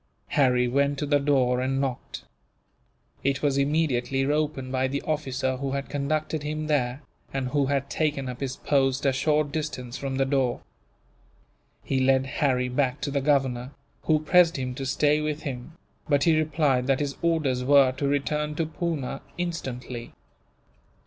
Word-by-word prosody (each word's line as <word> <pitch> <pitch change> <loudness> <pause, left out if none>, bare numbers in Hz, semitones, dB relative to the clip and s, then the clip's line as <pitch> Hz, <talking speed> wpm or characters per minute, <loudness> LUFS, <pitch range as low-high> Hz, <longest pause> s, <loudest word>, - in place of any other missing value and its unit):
Harry 125 -3 +3
went 140 +3 +1
to 145 - -2
the 145 0 +3
door, 130 -3 +2
and 135 +1 0
knocked. 135 -2 -4 1.0
It 140 +1 0
was 140 -2 +2
immediately 140 -3 +1
opened 145 -2 -1
by 130 0 +1
the 140 +2 -3
officer 130 -4 -1
who 135 0 -3
had 140 0 -3
conducted 150 +2 -1
him 155 +1 -3
there, 140 -2 0 0.3
and 135 -2 -2
who 140 0 +1
had 140 0 0
taken 145 -4 -1
up 125 -1 -6
his 135 -1 -3
post 135 -1 +1
a 135 - +3
short 150 +2 +1
distance 140 -5 -4
from 135 -1 -3
the 135 - +2
door. 135 -3 0 1.2
He 135 - 0
led 130 0 +3
Harry 130 -2 0
back 130 +1 0
to 140 - -2
the 140 0 0
governor, 135 -2 +1 0.3
who 155 - +4
pressed 170 +1 +4
him 130 -1 -3
to 135 +1 -5
stay 150 +3 +2
with 150 0 -3
him; 130 +2 -6 0.4
but 140 -2 +3
he 165 +1 +4
replied 150 -5 +1
that 135 -1 +2
his 145 -1 -2
orders 155 -7 +1
were 135 -1 +6
to 140 +2 -2
return 150 +2 -1
to 165 - 0
Poona, 160 -3 -3 0.2
instantly. 130 -8 -5
140 Hz, 165 wpm, -26 LUFS, 130-150 Hz, 1.2 s, were